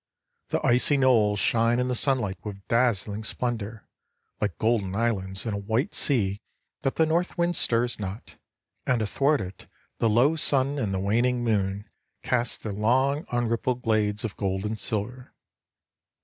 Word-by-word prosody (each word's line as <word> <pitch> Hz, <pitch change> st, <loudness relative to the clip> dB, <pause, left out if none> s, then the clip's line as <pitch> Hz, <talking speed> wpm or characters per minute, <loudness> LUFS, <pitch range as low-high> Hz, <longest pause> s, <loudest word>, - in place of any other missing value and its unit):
The -, -, -1 dB
icy 125 Hz, +4 st, +4 dB
knolls 115 Hz, -6 st, +3 dB
shine 115 Hz, +4 st, +2 dB
in 125 Hz, -, 0 dB
the 125 Hz, -, 0 dB
sunlight 120 Hz, -8 st, 0 dB
with 100 Hz, -2 st, -8 dB
dazzling 110 Hz, -3 st, +1 dB
splendor, 110 Hz, -2 st, -4 dB, 0.5 s
like 100 Hz, -4 st, -2 dB
golden 110 Hz, -4 st, 0 dB
islands 100 Hz, -4 st, -1 dB
in 110 Hz, -, -2 dB
a 100 Hz, -, -2 dB
white 110 Hz, +7 st, -1 dB
sea 105 Hz, -7 st, +1 dB, 0.4 s
that 135 Hz, -, -1 dB
the 160 Hz, -, +3 dB
north 170 Hz, +4 st, 0 dB
wind 175 Hz, 0 st, +1 dB
stirs 120 Hz, 0 st, +2 dB
not, 100 Hz, +2 st, -7 dB, 0.5 s
and 120 Hz, -3 st, +2 dB
athwart 140 Hz, +7 st, +1 dB
it 95 Hz, 0 st, -9 dB, 0.3 s
the 115 Hz, -, +2 dB
low 125 Hz, +9 st, +4 dB
sun 140 Hz, -2 st, +2 dB
and 110 Hz, -6 st, -1 dB
the 95 Hz, -, -1 dB
waning 120 Hz, +5 st, +1 dB
moon 100 Hz, -3 st, -1 dB, 0.4 s
cast 120 Hz, -1 st, -1 dB
their 105 Hz, -, -4 dB
long 130 Hz, +8 st, +1 dB
unrippled 120 Hz, +1 st, -1 dB
glades 105 Hz, -2 st, 0 dB
of 110 Hz, -4 st, -4 dB
gold 95 Hz, 0 st, -2 dB
and 110 Hz, 0 st, -3 dB
silver. 120 Hz, +4 st, -3 dB
115 Hz, 155 wpm, -26 LUFS, 105-125 Hz, 0.5 s, icy